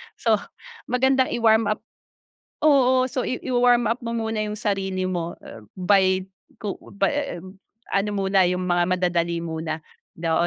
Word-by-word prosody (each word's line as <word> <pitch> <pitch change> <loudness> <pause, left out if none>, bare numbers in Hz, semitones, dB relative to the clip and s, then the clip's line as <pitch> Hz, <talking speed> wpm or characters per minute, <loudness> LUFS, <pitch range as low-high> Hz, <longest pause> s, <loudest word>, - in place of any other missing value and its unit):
So - - +2 0.5
magandang 260 +1 +2
i-warm 220 -2 +4
up 215 +1 -2 0.8
oo 260 -4 +5
so 255 0 -2
i 255 - -1
i-wa-warm 245 -1 +3
up 235 - -2
mo 235 -1 -4
muna 225 -1 -2
'yung 210 0 -3
sarili 195 -3 -1
mo 175 -2 -2 0.4
by 190 0 +3 0.3
ku 205 -2 -5 0.2
by, 275 +5 0
um, 190 +1 -13 0.3
ano 200 +1 +1
muna 190 -2 +3
'yung 180 0 -1
mga 175 -1 +2
madadali 170 -2 0
muna 160 -1 -4 0.3
daw 165 0 +1
195 Hz, 145 wpm, -23 LUFS, 180-240 Hz, 0.8 s, oo